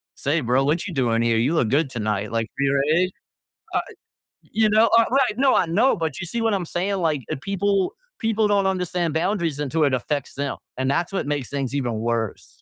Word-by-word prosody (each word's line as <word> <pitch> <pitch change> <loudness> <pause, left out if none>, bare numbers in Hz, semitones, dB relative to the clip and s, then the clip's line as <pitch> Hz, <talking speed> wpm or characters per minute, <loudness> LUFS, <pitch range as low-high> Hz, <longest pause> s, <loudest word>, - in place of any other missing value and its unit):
"Say, 150 +4 0
bro, 125 +2 +2
what 160 +6 0
you 185 - -6
doing 120 -5 +1
here? 115 -1 +2
You 125 +8 +2
look 120 -9 +2
good 140 +3 +2
tonight. 105 -4 -2
Like" 115 -1 0
Right? 140 +6 +2 0.6
Uh - - +3
eh - - -12 0.6
you 220 -1 +3
know, 220 +2 +5
uh, 230 - +6
right, 255 -4 +2
no, 270 0 +4
I - - +3
know, 220 +11 +3
but 160 -5 -3
you 185 - -4
see 235 +7 -3
what 225 -1 +1
I'm 190 -3 -1
saying? 185 +4 -1
Like, 160 -6 0
if - - -3
people 195 +1 0 0.3
people 220 -1 +1
don't 200 -1 +3
understand 180 -3 -1
boundaries 170 -3 0
until 150 +2 0
it 140 - +1
affects 140 +2 -2
them. 140 0 -3 0.2
And 130 0 0
that's 170 +6 0
what 195 - -1
makes 145 -4 -2
things 135 -2 -3
even 125 -4 -1
worse. 115 -1 -3
160 Hz, 215 wpm, -23 LUFS, 135-195 Hz, 0.6 s, uh